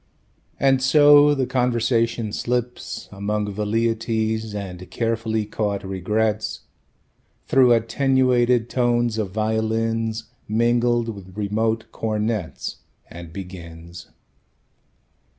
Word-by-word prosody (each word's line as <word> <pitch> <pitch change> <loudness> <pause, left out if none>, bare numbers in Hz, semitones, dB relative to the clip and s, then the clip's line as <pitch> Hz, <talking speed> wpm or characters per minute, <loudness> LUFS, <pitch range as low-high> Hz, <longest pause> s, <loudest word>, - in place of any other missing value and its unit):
And 135 -1 +3
so 145 +2 +6
the 135 -2 0
conversation 120 -3 0
slips 125 0 -3
Among 105 +1 -2
velleities 110 0 -1
and 90 -3 -7
carefully 115 -1 -1
caught 105 -1 -2
regrets 105 +3 -1 0.8
Through 130 -2 +5
attenuated 125 0 +2
tones 120 -2 +1
of 105 -3 -1
violins 110 +1 -1 0.2
Mingled 120 +1 +2
with 100 -3 -9
remote 110 +2 0
cornets 110 -4 -3 0.3
And 85 -1 -9
begins. 85 -2 -9
110 Hz, 85 wpm, -22 LUFS, 105-120 Hz, 0.8 s, so